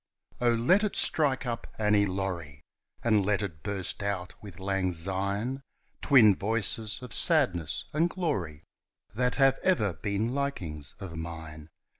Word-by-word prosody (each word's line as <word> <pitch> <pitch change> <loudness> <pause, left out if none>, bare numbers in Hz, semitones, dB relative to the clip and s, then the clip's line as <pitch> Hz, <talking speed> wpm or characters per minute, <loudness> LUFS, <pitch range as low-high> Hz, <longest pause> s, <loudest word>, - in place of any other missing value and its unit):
Oh, 120 -1 +4
let 180 - +3
it 210 - -1
strike 140 -4 +3
up 115 -1 -4
"Annie 105 -1 +3
Laurie," 90 -7 -4 0.4
And 110 -4 +3
let 100 +1 +1
it 85 -6 -6
burst 100 0 -3
out 100 -3 -3
with 100 -5 -11
"Lang 95 -1 -1
Syne" 100 +9 -2 0.4
Twin 115 -8 +6
voices 110 +2 -2
of 125 - -2
sadness 95 - +1
and 165 +3 +2
glory 95 - -3 0.5
That 125 +3 0
have 135 -1 +4
ever 110 - +2
been 105 +6 -2
likings 90 - -4
of 90 -4 -7
mine. 80 -1 -7
100 Hz, 140 wpm, -29 LUFS, 90-125 Hz, 0.5 s, Twin